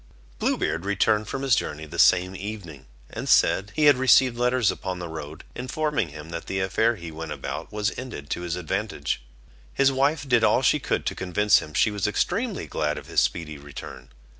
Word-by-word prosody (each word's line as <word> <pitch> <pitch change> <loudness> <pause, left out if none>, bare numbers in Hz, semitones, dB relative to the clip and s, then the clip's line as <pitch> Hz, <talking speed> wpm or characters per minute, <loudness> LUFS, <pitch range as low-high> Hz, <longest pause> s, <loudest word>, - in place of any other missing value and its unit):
Blue - - +1
Beard 80 +2 -1
returned 100 +1 +1
from 135 +4 -4
his 135 -4 +4
journey 75 -5 -3
the 75 - -7
same 90 +1 +4
evening, 90 -9 -7 0.2
and - - -5
said, 100 +2 +4
he 155 - +3
had 145 -3 +7
received 130 -1 +5
letters 125 -1 +2
upon 95 -1 -5
the 90 -1 -5
road, 80 -1 -8
informing 150 - -1
him 75 +2 -10
that 85 0 -6
the 95 - -2
affair 110 +5 +1
he 85 -4 -8
went 80 0 -7
about 75 - -5
was 105 +1 -1
ended 125 - -8
to - - -2
his 85 -1 -3
advantage. 90 - -3 0.5
His 135 - +3
wife 140 +2 +1
did 120 -3 +3
all - - +4
she - - +4
could - - -2
to - - -1
convince 100 +3 +3
him 75 - -9
she 110 - +3
was 105 -1 -1
extremely 215 - -1
glad 75 -1 -2
of - - -8
his - - +2
speedy 80 -3 -2
return. 70 -2 -10
95 Hz, 200 wpm, -25 LUFS, 80-125 Hz, 0.5 s, had